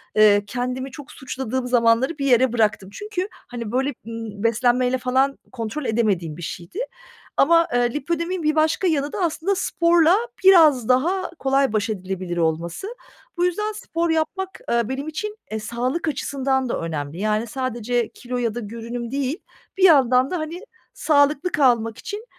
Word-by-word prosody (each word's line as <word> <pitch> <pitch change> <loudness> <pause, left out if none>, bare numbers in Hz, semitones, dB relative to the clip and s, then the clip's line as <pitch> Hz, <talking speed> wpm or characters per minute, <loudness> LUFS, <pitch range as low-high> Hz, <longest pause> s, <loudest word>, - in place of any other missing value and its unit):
eee, 205 -1 +6
kendimi 250 +4 -3
çok 290 +2 -11
suçladığım 260 -1 -4
zamanları 245 +5 +3
bir 275 - -2
yere 255 -2 +4
bıraktım. 210 -4 +1
Çünkü, 410 -2 -4 0.2
hani, 235 -3 -6
böyle, 265 +3 0
ımm, 225 -2 -6
beslenmeyle 245 +2 +2
falan 260 +2 +1
kontrol 235 +4 -4
edemediğim 195 -9 0
bir - - -9
şeydi 175 - -7 0.6
ama, 335 +3 +5
eee, 245 -1 +2
Lipödem 335 +4 -2
in 365 -4 -3
bir 305 +1 +2
başka 315 +4 +2
yanı 290 -3 0
da - - -3
aslında 340 +4 0
sporla 340 -1 +3 0.3
biraz 310 - +6
daha 350 +9 +2
kolay 270 -3 +2
baş 215 +1 0
edilebilir 185 -3 -4
olması. 165 - -1 0.5
Bu 350 - +2
yüzden 420 +4 -1
spor 340 -5 -3
yapmak, 345 +4 -2
eee, 235 0 +1
benim 275 +3 -4
için, 425 +7 -5
eee, 220 - -2
sağlık 245 +9 -2
açısından 270 -3 -1
da - - -1
önemli. 155 -1 -4
Yani, 215 +2 0
sadece 240 -2 -2
kilo 250 +1 -6
ya 235 -2 -1
da - - -2
görünüm 235 +2 -6
değil, 280 +3 -1 0.4
bir 380 - 0
yandan 265 -5 +5
da, 360 - 0
hani, 325 +4 -5 0.3
sağlıklı 300 +3 +2
kalmak 235 -5 +2
için 420 +3 -7
255 Hz, 160 wpm, -22 LUFS, 230-315 Hz, 0.6 s, eee